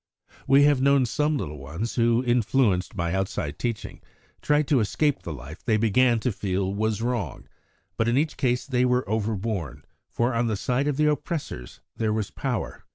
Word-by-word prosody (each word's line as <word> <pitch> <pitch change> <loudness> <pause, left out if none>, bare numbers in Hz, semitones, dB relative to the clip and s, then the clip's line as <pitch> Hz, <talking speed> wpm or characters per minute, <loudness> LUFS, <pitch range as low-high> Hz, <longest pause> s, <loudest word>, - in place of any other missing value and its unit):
We 140 +1 +6
have 145 -3 +4
known 140 0 +4
of - - 0
some 150 +4 +1
little 75 - -5
ones 80 +12 -4
who, 115 0 +2
influenced 120 -6 +2
by 85 -2 -1
outside 85 -6 -2
teaching, 115 -3 -4 0.4
tried 150 -1 +2
to 140 - +4
escape 140 +7 +1
the 85 - -6
life 75 +2 -9
they 110 -2 +2
began 115 +2 +3
to 125 - 0
feel 95 -1 -2
was 110 +1 -1
wrong, 120 - -3 0.5
but 115 - +1
in 120 +2 +2
each 155 +2 +1
case 125 -3 0
they 125 -3 +1
were 125 -2 +1
overborne, 105 - -2 0.2
for 120 +2 0
on 115 0 +1
the 110 -2 -1
side 125 +7 0
of 145 -2 0
the 150 - +3
oppressors 150 - -3 0.2
there 110 -1 0
was 110 -2 -2
power. 125 -7 -4
115 Hz, 185 wpm, -25 LUFS, 100-130 Hz, 0.5 s, We